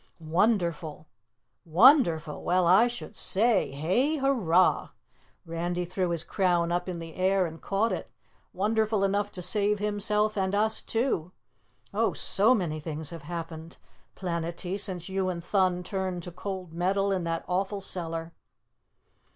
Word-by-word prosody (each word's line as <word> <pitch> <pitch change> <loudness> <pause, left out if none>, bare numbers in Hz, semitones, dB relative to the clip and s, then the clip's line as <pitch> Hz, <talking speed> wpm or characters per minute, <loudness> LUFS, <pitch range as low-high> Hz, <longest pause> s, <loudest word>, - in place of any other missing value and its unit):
"Wonderful! 170 -6 +1 0.6
Wonderful? 170 - +4
Well, 180 0 +2
I 190 +7 +6
should 240 -3 -7
say 215 +1 +2
hay 185 - +1
hurray!" 220 - +2 0.6
Randy 175 +2 -2
threw 180 +1 -1
his 170 -1 -1
crown 175 -3 +1
up 175 +1 -1
in 180 - -4
the 165 -1 -8
air 190 0 +2
and 160 -1 -8
caught 205 +4 0
it. - - -4 0.4
"Wonderful 215 +1 +1
enough 200 +1 0
to 180 - -4
save 205 +3 +2
himself 210 +1 0
and 190 -1 0
us 220 +1 +2
too. 225 -8 -1 0.6
Oh, - - +1
SO 220 +6 +3
many 165 -7 -2
things 155 -1 -4
have 165 -2 -8
happened, 165 -1 -6 0.4
Planetty, 170 +1 -3
since 185 -4 -1
you 190 -1 -1
and 170 -2 -4
Thun 185 -2 +1
turned 185 -2 -3
to 175 - -7
cold 185 -1 -6
metal 195 +3 +1
in 185 -2 0
that 165 0 -2
awful 195 +3 -1
cellar!" 165 -3 -4
185 Hz, 145 wpm, -28 LUFS, 170-205 Hz, 0.6 s, I